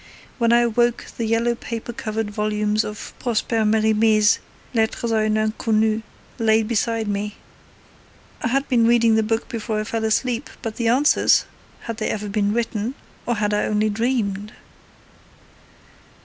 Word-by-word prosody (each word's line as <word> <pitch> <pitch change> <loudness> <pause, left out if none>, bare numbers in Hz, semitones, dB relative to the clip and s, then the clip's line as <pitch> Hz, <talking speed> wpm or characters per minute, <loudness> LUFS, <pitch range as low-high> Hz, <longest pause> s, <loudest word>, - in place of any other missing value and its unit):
When 235 -1 +3
I 240 0 +5
awoke 240 0 +1
the 230 - -2
yellow 230 +1 +2
paper 230 0 -6
covered 220 -4 -3
volumes 210 0 0
of 210 0 -7
Prosper 225 -1 0
Merimee's 215 0 +3 0.3
Lettres 230 0 0
a 220 -1 +2
une 215 0 +1
Inconnue 215 0 +1 0.4
lay 220 -1 +3
beside 225 0 -1
me; 205 +1 -3 1.1
I - - 0
had 270 +3 0
been 235 -3 +3
reading 230 -1 +4
the 220 - +4
book 225 +1 -1
before 220 -2 -3
I - - -1
fell 225 +1 -3
asleep, 235 +3 0
but 225 -2 -4
the 235 - 0
answers 265 +6 +4 0.4
had 230 -2 -6
they - - -2
ever 210 -1 -3
been 205 0 +1
written, 230 +1 -2 0.3
or 240 - +1
had 210 -1 0
I 210 - +1
only 215 0 +1
dreamed?' 210 -3 -1
220 Hz, 150 wpm, -22 LUFS, 215-235 Hz, 1.1 s, I